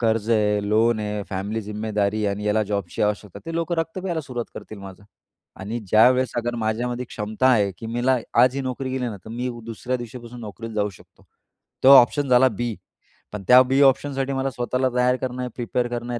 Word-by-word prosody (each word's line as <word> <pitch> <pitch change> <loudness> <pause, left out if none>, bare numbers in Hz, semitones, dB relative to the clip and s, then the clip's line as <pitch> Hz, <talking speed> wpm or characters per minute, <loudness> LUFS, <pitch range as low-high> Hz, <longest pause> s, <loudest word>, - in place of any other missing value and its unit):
कर्ज 115 -1 0
आहे, 105 -2 +2
लोन 110 +1 +2
आहे, 105 -1 -3
फॅमिली 100 +3 -3
जिम्मेदारी 105 0 -2
आणि 100 +1 -2
याला 105 +1 +2
जॉबची 100 -3 -3
आवश्यकता, 105 -2 -2
ते 165 - -5
लोकं 165 +1 -1
रक्त 165 +2 -2
प्यायला 175 -3 -2
सुरुवात 125 -5 -5
करतील 110 - -9
माझं. 100 0 -11 0.6
आणि 105 +5 -4
ज्यावेळेस 125 +5 +4
अगर 120 0 -1
माझ्यामध्ये 120 +3 -2
क्षमता 110 +3 -2
आहे, 105 -6 +3
की 115 - -7
मला 120 +3 +1 0.3
आज 125 0 +4
ही - - -1
नोकरी 130 0 -4
गेली 130 -1 -2
ना, 110 - -6
तर - - -10
मी 120 +2 -3 0.2
दुसऱ्या 115 +3 -3
दिवशीपासून 120 0 -9
नोकरीला 115 +1 -8
जाऊ 105 -1 0
शकतो, 90 - -20 0.6
तेव्हा 135 +1 +10
ऑप्शन 140 +4 +1
झाला 125 +1 +6
बी, 120 0 -3 0.6
पण 105 -2 -6
त्या 125 +1 +9
बी 135 +2 +1
ऑप्शनसाठी 135 0 +2
मला 135 0 -1
स्वतःला 125 +1 -1
तयार 125 0 +3
करणं 125 -1 -3
आहे, 125 - -3
प्रिपेअर 120 0 -1
करणं 120 0 -4
आहे, 120 - -3
120 Hz, 195 wpm, -23 LUFS, 105-130 Hz, 0.6 s, तेव्हा